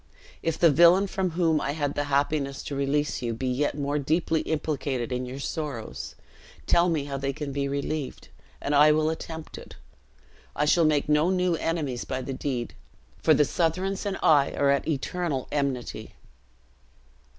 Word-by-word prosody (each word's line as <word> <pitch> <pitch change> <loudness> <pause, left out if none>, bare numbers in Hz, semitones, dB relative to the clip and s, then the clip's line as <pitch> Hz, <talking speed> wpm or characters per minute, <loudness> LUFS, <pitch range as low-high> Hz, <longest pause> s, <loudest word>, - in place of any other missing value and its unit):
If 165 -1 -1
the 170 -3 +5
villain 170 +6 +6
from 190 -1 -1
whom 165 -4 +2
I 140 - -1
had 145 -2 -1
the 145 - -1
happiness 140 0 0
to 140 - -5
release 140 +2 0
you 115 -2 -2
be 130 - -4
yet 130 +3 0
more 145 +1 -1
deeply 160 +2 +1
implicated 140 -5 -2
in 125 0 -2
your 130 +2 -6
sorrows, 140 -4 -5 0.5
tell 175 +1 +4
me 160 -4 0
how 140 -1 -4
they 135 0 -1
can 145 0 -5
be 140 0 -1
relieved, 140 0 -4 0.3
and 145 - -2
I 150 +1 +7
will 155 +1 +2
attempt 160 0 -7
it. - - -12 0.8
I 150 - +1
shall 165 +2 +4
make 150 -2 +2
no 150 +3 +3
new 180 -1 +1
enemies 155 -7 -2
by 130 0 -4
the 135 - -4
deed, 125 - -3 0.5
for 155 - +5
the 150 - +4
Southrons 185 +5 -1
and 195 - -2
I 145 -3 +4
are 140 -1 +2
at 140 - 0
eternal 155 -1 -2
enmity." 140 -4 -3
145 Hz, 175 wpm, -26 LUFS, 140-160 Hz, 0.8 s, I